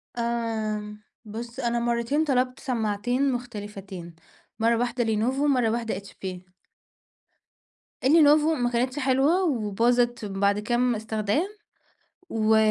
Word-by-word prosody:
آمم، 220 Hz, -3 st, -2 dB, 0.2 s
بُصّ 235 Hz, +4 st, -7 dB
أنا 235 Hz, -2 st, 0 dB
مرتين 235 Hz, +5 st, +1 dB
طلبت 255 Hz, -2 st, 0 dB
سماعتين 245 Hz, +2 st, 0 dB
مختلفتين، 205 Hz, -7 st, -7 dB, 0.4 s
مَرّة 230 Hz, +1 st, +3 dB
واحدة 240 Hz, +1 st, 0 dB
لينوفو 230 Hz, +5 st, 0 dB
ومَرّة 250 Hz, -5 st, +3 dB
واحدة 225 Hz, -2 st, -1 dB
HP. 200 Hz, -1 st, -9 dB, 1.8 s
اللينوفو 305 Hz, +2 st, +5 dB
ما 245 Hz, -4 st, 0 dB
كانتش 250 Hz, +4 st, -1 dB
حلوة 275 Hz, +7 st, +3 dB
وباظت 240 Hz, -, +1 dB
بعد 200 Hz, +1 st, +1 dB
كام 240 Hz, +2 st, +1 dB
استخدام، 220 Hz, -, -1 dB, 0.8 s
و 220 Hz, 0 st, +3 dB
235 Hz, 105 wpm, -26 LUFS, 215-255 Hz, 1.8 s, اللينوفو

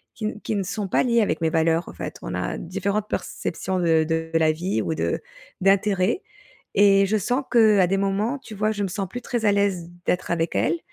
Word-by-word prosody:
qui 220 Hz, -, -5 dB
n 215 Hz, 0 st, -4 dB
qui 215 Hz, -, -2 dB
ne 195 Hz, -, 0 dB
sont 200 Hz, +2 st, -3 dB
pas 190 Hz, -, +2 dB
liées 235 Hz, -2 st, +3 dB
avec 165 Hz, -6 st, 0 dB
mes 160 Hz, -, +2 dB
valeurs, 165 Hz, +1 st, +1 dB
en -, -, -9 dB
fait, -, -, -6 dB
on -, -, -5 dB
a -, -, -2 dB
différentes 200 Hz, +4 st, -2 dB
perceptions 190 Hz, -1 st, -3 dB
de 160 Hz, -2 st, +3 dB
de 160 Hz, 0 st, -2 dB
la 160 Hz, -1 st, +4 dB
vie 180 Hz, +5 st, -1 dB
ou 160 Hz, -, -2 dB
de -, -, -1 dB, 0.4 s
d'intérêt 195 Hz, -, +2 dB, 0.5 s
et 195 Hz, -1 st, +6 dB
je 215 Hz, +2 st, +1 dB
sens 245 Hz, +7 st, 0 dB
que 220 Hz, -4 st, +5 dB
à 185 Hz, -, +5 dB
des 195 Hz, +2 st, +1 dB
moments, 200 Hz, +7 st, 0 dB
tu 220 Hz, -5 st, -10 dB
vois, 215 Hz, +2 st, +1 dB
je 205 Hz, -1 st, -2 dB
me -, -, 0 dB
sens 195 Hz, +2 st, -3 dB
plus 245 Hz, -, -6 dB
très 240 Hz, -1 st, -3 dB
à 205 Hz, -, +5 dB
l'aise 200 Hz, -4 st, 0 dB, 0.2 s
d'être 180 Hz, -1 st, -1 dB
avec 165 Hz, -1 st, -1 dB
elles 345 Hz, -, +1 dB
195 Hz, 230 wpm, -24 LUFS, 175-215 Hz, 0.5 s, et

